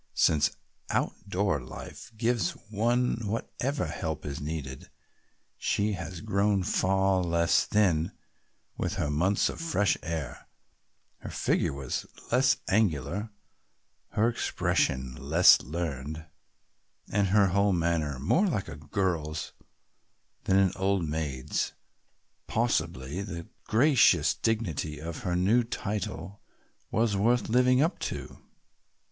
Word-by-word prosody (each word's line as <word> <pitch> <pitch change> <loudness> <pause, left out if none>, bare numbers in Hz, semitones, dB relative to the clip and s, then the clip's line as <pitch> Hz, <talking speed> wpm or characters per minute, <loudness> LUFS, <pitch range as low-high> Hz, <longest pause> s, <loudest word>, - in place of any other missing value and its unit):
Since 75 -2 +3 0.3
outdoor 95 -6 -1
life 65 - -10
gives 115 0 +1 0.2
one 120 +4 +1
whatever 125 +6 -2
help 80 -4 -4
is 70 0 -5
needed, 70 -4 -5 0.7
she 105 +1 0
had 90 +2 -6
grown 100 -2 +2
far 95 +1 +2
less 85 -1 +2
thin 90 -7 +2 0.6
with - - -2
her 75 - -1
months 90 +7 +2
of - - -5
fresh 105 -12 +2
air, 80 -5 -5 0.7
her - - -8
figure - - 0
was 70 -2 -4 0.2
less 130 +2 +4
angular, 100 - 0 0.8
her 110 +2 +3
expression 65 - 0
less 80 +7 +6
learned 80 0 -4 0.9
and 100 0 +2
her 100 0 +4
whole 100 +2 +3
manner 85 -5 0
more 165 - +2
like 105 - -1
a - - -7
girl's 75 -1 -2 0.9
than 95 - +3
an 95 -2 +4
old 95 -3 +1
maid's. 75 -4 -2 0.7
Possibly 85 - -1
the 85 -4 -6 0.2
gracious 110 - +4
dignity 80 -5 -1
of 80 +1 -6
her 90 -1 -2
new 105 +7 +3
title 100 -3 -4 0.5
was 110 0 +1
also 100 0 0
worth 120 0 +2
living 125 +3 +4
up 165 - -1
to. - - -5
95 Hz, 115 wpm, -28 LUFS, 80-105 Hz, 0.9 s, less